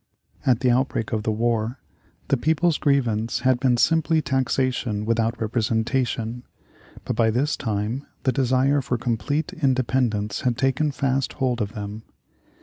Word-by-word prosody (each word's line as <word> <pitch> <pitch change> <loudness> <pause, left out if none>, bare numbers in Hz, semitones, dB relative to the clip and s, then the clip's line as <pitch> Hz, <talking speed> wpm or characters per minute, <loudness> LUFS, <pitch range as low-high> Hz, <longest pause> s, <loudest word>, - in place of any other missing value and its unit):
At 125 -2 +3
the 125 -2 +3
outbreak 125 -3 0
of 110 - 0
the 110 - -1
war 115 +2 0 0.5
the - - +4
people's 160 +5 +1
grievance 120 -6 +1
had 130 0 +3
been 125 -2 +2
simply 160 +3 +3
taxation 130 -6 0
without 115 +1 0
representation, 115 +1 -1 0.6
but - - -2
by 110 0 +3
this 135 +7 +1
time 110 +3 -3 0.2
the 130 - +3
desire 130 +2 +2
for 125 -1 -2
complete 140 +9 -2
independence 130 - 0
had 125 -3 0
taken 135 +3 +1
fast 135 -2 -1
hold 125 -2 -1
of 105 +1 -3
them. 105 -1 -6
125 Hz, 145 wpm, -23 LUFS, 115-135 Hz, 0.6 s, the